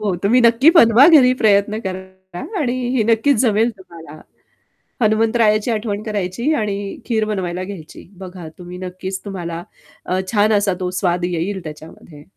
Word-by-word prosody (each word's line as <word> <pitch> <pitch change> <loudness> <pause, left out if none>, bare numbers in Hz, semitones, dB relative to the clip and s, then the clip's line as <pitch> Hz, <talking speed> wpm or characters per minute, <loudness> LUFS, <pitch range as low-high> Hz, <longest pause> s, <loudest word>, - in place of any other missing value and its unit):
हो. 205 -3 -1
तुम्ही 235 +6 +3
नक्की 235 +6 +5
बनवा 260 -5 +6
घरी, 270 -7 +6
प्रयत्न 210 0 +2
करा 190 -1 -8 0.2
आणि 250 -5 0 0.2
ही 235 - +2
नक्कीच 230 +5 +2
जमेल 225 -1 +2
तुम्हाला. 165 -4 -13 0.8
हनुमंतरायाची 220 0 +2
आठवण 215 -2 -3
करायची 215 - -2
आणि 210 -6 -2 0.3
खीर 225 -3 0
बनवायला 185 -3 -3
घ्यायची. 185 -6 -11
बघा 180 -3 -9
तुम्ही 180 0 -10
नक्कीच 185 +1 -6
तुम्हाला 170 -4 -6 0.4
अ, 185 +1 -1
छान 215 0 +3
असा 200 -2 +1
तो 180 -1 -2
स्वाद 175 -2 0
येईल 180 +2 -3
त्याच्यामध्ये. 155 0 -12
200 Hz, 145 wpm, -18 LUFS, 180-225 Hz, 0.8 s, बनवा